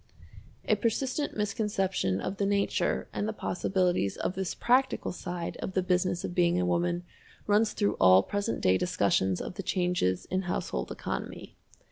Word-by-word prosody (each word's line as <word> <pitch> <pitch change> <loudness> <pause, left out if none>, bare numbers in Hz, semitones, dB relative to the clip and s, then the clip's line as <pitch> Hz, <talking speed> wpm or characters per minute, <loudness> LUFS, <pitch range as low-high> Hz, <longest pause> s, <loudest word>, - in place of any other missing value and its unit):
A - - +4
persistent 260 +5 -1
misconception 195 - 0
of 195 - -4
the 200 - 0
nature 200 0 0
and 205 - -2
the 220 - -2
possibilities 180 - 0
of - - -2
this 190 -1 -3
practical 255 +2 +2
side 175 -1 -5
of 190 - -5
the 185 - +1
Business 180 -1 +1
of - - -4
Being 175 0 +3
a 180 - +1
Woman 175 0 0 0.4
runs 210 +1 +3
through 205 - 0
all 95 +1 +7
present 200 - -2
day 95 0 +3
discussions 95 -1 +1
of - - -6
the - - -2
changes 175 - 0
in 185 +1 +1
household - - -2
economy. - - -5
180 Hz, 160 wpm, -29 LUFS, 175-205 Hz, 0.4 s, all